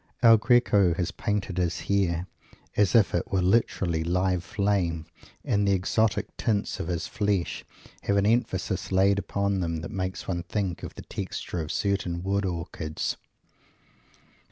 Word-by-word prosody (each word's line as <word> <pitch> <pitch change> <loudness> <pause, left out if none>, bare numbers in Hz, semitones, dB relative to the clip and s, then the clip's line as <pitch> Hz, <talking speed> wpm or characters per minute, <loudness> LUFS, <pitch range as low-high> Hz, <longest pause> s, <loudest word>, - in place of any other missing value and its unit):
El 115 -1 +9
Greco 105 -6 +4
has 90 +1 -1
painted 100 -4 -2
his 90 -1 0
hair 90 -3 0 0.5
as 105 +2 +3
if 110 -4 +5
it - - -1
were 95 - +2
literally 90 -4 +1
live 90 +1 +1
flame 90 -4 0 0.4
and 100 0 +2
the 100 - +4
exotic 105 +4 0
tints 105 -3 -1
of - - -3
his 85 -3 -2
flesh 100 -6 -1 0.4
have 100 - +2
an 100 - +3
emphasis 105 -5 0
laid 100 +1 +4
upon 100 -1 -1
them 85 -3 -2
that 75 - -6
makes 95 -1 -4
one 85 -2 -1
think 90 0 -3
of - - -7
the - - -9
texture 85 - -4
of 75 - -4
certain 90 -4 -1
wood 100 +1 0
orchids. 85 -3 -3
95 Hz, 155 wpm, -27 LUFS, 85-100 Hz, 0.5 s, El